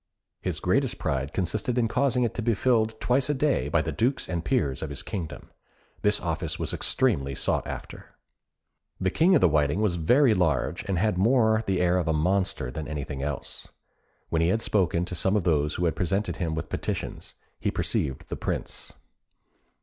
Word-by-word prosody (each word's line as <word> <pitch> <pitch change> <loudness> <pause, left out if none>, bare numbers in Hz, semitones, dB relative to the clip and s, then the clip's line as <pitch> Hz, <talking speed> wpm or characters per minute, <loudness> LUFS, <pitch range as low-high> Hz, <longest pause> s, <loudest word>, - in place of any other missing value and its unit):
His - - -2
greatest - - +1
pride 70 +1 -2
consisted 100 +8 -1
in 120 -2 +3
causing 125 +1 +1
it 120 - 0
to - - -3
be 115 0 +1
filled 110 -1 +1
twice 130 +2 +1
a 150 - +2
day 145 +1 +1
by - - +2
the - - -2
dukes 125 +4 0
and 85 -2 -2
peers 80 - 0
of 80 - -3
his 70 - -6
kingdom. 85 -6 -6 0.5
This - - +2
office - - -3
was - - -3
extremely 70 - +1
sought - - 0
after. - - -8 0.8
The 95 -1 0
King 180 - +4
of - - +4
the 90 - +6
Whiting 75 +2 +2
was 105 -5 +1
very 120 - +4
large, 85 - +1
and 95 -3 -1
had 100 -1 +1
more 110 0 +4
the 95 -2 +1
air 90 0 +3
of 85 - -2
a 80 - +2
monster 85 -5 0
than 75 +3 -5
of - - -8
anything 70 -2 -4
else. 70 -2 -5 0.6
When 80 - +1
he 85 - +3
had 110 +6 +1
spoken 90 -4 +1
to 90 - -6
some 95 +4 0
of 105 - +2
those 75 -3 +1
who 90 - 0
had 80 -3 +1
presented 95 +4 -1
him 80 -4 -2
with 80 -1 -4
petitions, - - -4 0.2
he - - 0
perceived 65 -1 -2
the - - -4
Prince. - - -4
90 Hz, 195 wpm, -26 LUFS, 80-110 Hz, 0.8 s, the